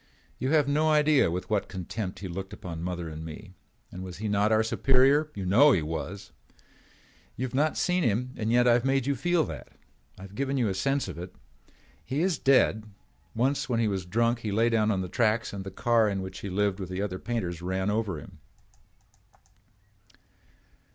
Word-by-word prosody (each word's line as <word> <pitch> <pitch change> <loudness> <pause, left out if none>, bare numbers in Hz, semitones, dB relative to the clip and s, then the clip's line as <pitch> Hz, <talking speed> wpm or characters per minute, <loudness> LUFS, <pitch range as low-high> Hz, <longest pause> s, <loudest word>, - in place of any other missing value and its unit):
You 130 - -1
have 150 -2 +3
no 150 +2 +2
idea 150 - +4
with 90 +3 -4
what 105 -2 +1
contempt 95 +1 -5
he 95 - -4
looked 95 +3 -6
upon 85 -4 -7
mother 90 -1 -4
and 80 0 -7
me. 80 +4 -9 0.4
And 90 - -8
was 90 -2 -7
he 110 +2 -4
not 105 +1 +2
our 110 0 +4
superior? 135 +6 +3
You 95 - -4
know 130 +10 +6
he 85 - +1
was. 90 +5 -5 1.0
You 130 - -2
have 130 - -7
not 150 +4 +1
seen 180 0 +1
him 125 0 0
and 110 0 -2
yet 120 +1 +4
I 120 - +6
have 120 0 +2
made 135 -1 +1
you 140 0 +1
feel 175 +5 +1
that. - - -7 0.5
I 95 - -11
have 95 0 -11
given 135 +4 -1
you 120 -5 +1
a - - -1
sense 135 +8 0
of - - -7
it. 90 +1 -8 0.7
He 135 - -2
is 180 -5 0
dead. 130 -5 +3 0.5
Once 135 +4 0
when 115 -2 +1
he 115 - +2
was 95 -3 -3
drunk 115 +5 +1
he 110 -3 -4
lay 115 +3 +2
down 110 -1 +2
on 95 -3 +1
the 90 - -4
tracks 110 +3 0
and 100 -1 -5
the 95 - -6
car 115 +2 +2
in 95 -1 -2
which 95 - -7
he 100 - -6
lived 100 +1 0
with 95 -2 -5
the 95 +2 -3
other 95 -3 -4
painters 95 -7 -3
ran 95 +2 -1
over 105 -7 -1
him." - - -14
110 Hz, 205 wpm, -27 LUFS, 95-130 Hz, 1.0 s, know